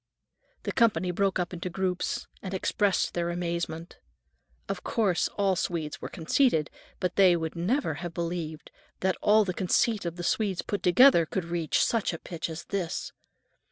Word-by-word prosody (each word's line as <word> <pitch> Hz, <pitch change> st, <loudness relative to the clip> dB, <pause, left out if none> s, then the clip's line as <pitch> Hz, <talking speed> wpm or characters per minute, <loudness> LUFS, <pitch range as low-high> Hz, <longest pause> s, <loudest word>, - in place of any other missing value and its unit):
The -, -, -2 dB
company 220 Hz, -7 st, +2 dB
broke 195 Hz, +2 st, +1 dB
up 180 Hz, 0 st, -2 dB
into 180 Hz, +1 st, -4 dB
groups 180 Hz, 0 st, -2 dB, 0.2 s
and 190 Hz, -1 st, -4 dB
expressed 195 Hz, 0 st, +1 dB
their 170 Hz, 0 st, -1 dB
amazement. 170 Hz, -1 st, -4 dB, 0.7 s
Of 195 Hz, -2 st, -4 dB
course 200 Hz, -6 st, +1 dB
all 195 Hz, -2 st, +2 dB
Swedes 170 Hz, -4 st, -3 dB
were -, -, -5 dB
conceited, 165 Hz, -, +1 dB, 0.3 s
but 180 Hz, -1 st, -2 dB
they 185 Hz, -3 st, +6 dB
would 160 Hz, -1 st, -3 dB
never 185 Hz, -, 0 dB
have 175 Hz, -2 st, -4 dB
believed 165 Hz, -2 st, -4 dB, 0.3 s
that 190 Hz, 0 st, +2 dB
all 215 Hz, +1 st, +5 dB
the 185 Hz, -, -2 dB
conceit 200 Hz, +4 st, +1 dB
of 170 Hz, -1 st, -3 dB
all -, -, -17 dB
the 175 Hz, -, -5 dB
Swedes 195 Hz, 0 st, 0 dB
put 205 Hz, -, -3 dB
together 180 Hz, -, +6 dB
would 190 Hz, -4 st, -1 dB
reach 170 Hz, -2 st, +1 dB
such 230 Hz, -6 st, 0 dB
a -, -, -4 dB
pitch 170 Hz, 0 st, -5 dB
as 160 Hz, +1 st, -6 dB
this. 185 Hz, -5 st, -3 dB
180 Hz, 170 wpm, -28 LUFS, 170-195 Hz, 0.7 s, they